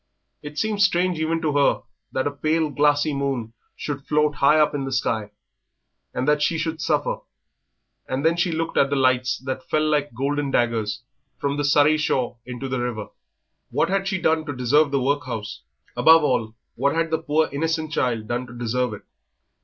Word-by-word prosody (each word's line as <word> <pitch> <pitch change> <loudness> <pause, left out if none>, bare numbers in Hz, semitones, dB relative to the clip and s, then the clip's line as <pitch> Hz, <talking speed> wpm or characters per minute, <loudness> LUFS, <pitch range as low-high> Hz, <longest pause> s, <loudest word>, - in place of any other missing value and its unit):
It 150 0 -9
seemed 215 +1 0
strange 180 -2 +2
even 165 +1 -1
to 155 - +1
her 140 -1 +3 0.3
that 130 - -1
a 145 - 0
pale, 155 +2 0
glassy 145 +1 +2
moon 135 -5 -2 0.2
should 145 -1 -5
float 150 0 +2
high 145 +2 +4
up 150 - +3
in 145 -2 -2
the 135 - -4
sky, 110 -4 -1 0.8
and 125 +2 -2
that 150 0 +3
she 165 +2 +1
should 160 0 -3
suffer; - - 0 0.9
and 130 +3 -2
then 165 +1 +4
she 175 0 +1
looked 165 0 -2
at 135 - +4
the 140 - 0
lights 130 -2 +2
that 130 -1 -5
fell 155 0 +2
like 145 -4 0
golden 140 +3 -1
daggers 115 -4 0 0.3
from 140 0 -1
the 145 - -1
Surrey 145 +2 +4
shore 130 -5 0
into 125 +2 -5
the 130 -1 -2
river. 120 -4 -3 0.6
What - - +1
had 195 0 0
she 190 -1 -1
done 160 -1 +2
to 145 - -4
deserve 140 +5 +3
the 140 0 +1
workhouse? 130 -5 -2 0.3
Above 160 0 +6
all, 115 -5 0 0.2
what 140 +5 0
had 165 0 0
the 160 - +1
poor, 155 +1 +1
innocent 160 +2 -1
child 115 -7 -1
done 120 +2 -2
to 120 0 -11
deserve 120 -1 -1
it? - - -14
145 Hz, 190 wpm, -23 LUFS, 125-155 Hz, 0.9 s, Above